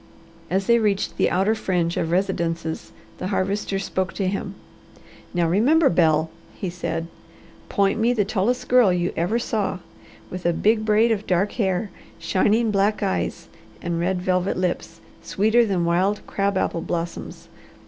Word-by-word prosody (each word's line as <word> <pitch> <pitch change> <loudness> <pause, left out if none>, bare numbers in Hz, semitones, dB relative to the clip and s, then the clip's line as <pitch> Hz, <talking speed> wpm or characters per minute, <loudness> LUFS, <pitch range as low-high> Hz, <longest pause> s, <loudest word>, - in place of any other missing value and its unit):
As 190 +2 0
they 235 +2 +4
reached 205 -3 0
the - - +3
outer 195 +4 +2
fringe 180 -6 -1
of 165 - -1
residences 170 -3 -1 0.3
the 185 - -3
Harvester 195 +1 -1
spoke 190 -1 -2
to 195 - -2
him. 195 0 -3 0.8
"Now 175 -2 +1
remember, 270 - +4
Bel," 160 -2 +2 0.2
he 185 -4 -4
said. 165 -2 -3 0.6
"Point 200 +2 +1
me 230 +2 +3
the 215 -5 +1
tallest 215 +5 -1
girl 245 -6 +5
you 175 0 0
ever 175 +8 0
saw, 215 -5 -1 0.5
with 185 0 -6
a 170 - +2
big 215 +5 +2
braid 220 +2 +3
of 215 -2 -1
dark 190 +3 +1
hair, 190 -2 -1 0.3
shining 210 +7 +1
black 205 +1 +1
eyes, 195 - -2 0.3
and 170 -1 -3
red 180 +1 -1
velvet 185 0 0
lips, 180 -1 -3 0.2
sweeter 220 +3 +2
than 180 -4 0
wild 185 +5 +1
crab 200 -1 -1
apple 165 - -1
blossoms. 170 0 -5
190 Hz, 155 wpm, -23 LUFS, 175-210 Hz, 0.8 s, girl